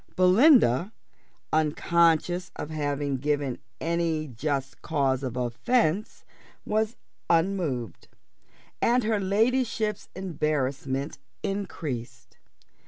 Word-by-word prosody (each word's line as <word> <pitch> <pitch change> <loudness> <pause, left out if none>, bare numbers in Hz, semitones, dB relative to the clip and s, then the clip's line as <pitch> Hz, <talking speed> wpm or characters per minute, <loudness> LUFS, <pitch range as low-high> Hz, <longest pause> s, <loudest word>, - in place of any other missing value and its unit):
Belinda, 185 - +5 0.6
unconscious 170 +3 +2
of 150 - -6
having 145 -2 -1
given 145 -1 -1 0.2
any 165 -2 0
just 135 +1 -3
cause 140 -4 0
of 130 -3 -4
offence, 170 - 0 0.4
was 215 +1 0 0.3
unmoved; 165 - 0 0.7
and 245 +1 +3
her 215 -1 +1
ladyship's 220 +1 0
embarrassment 140 -5 -2 0.2
increased. 125 - -5
160 Hz, 80 wpm, -27 LUFS, 135-195 Hz, 0.7 s, Belinda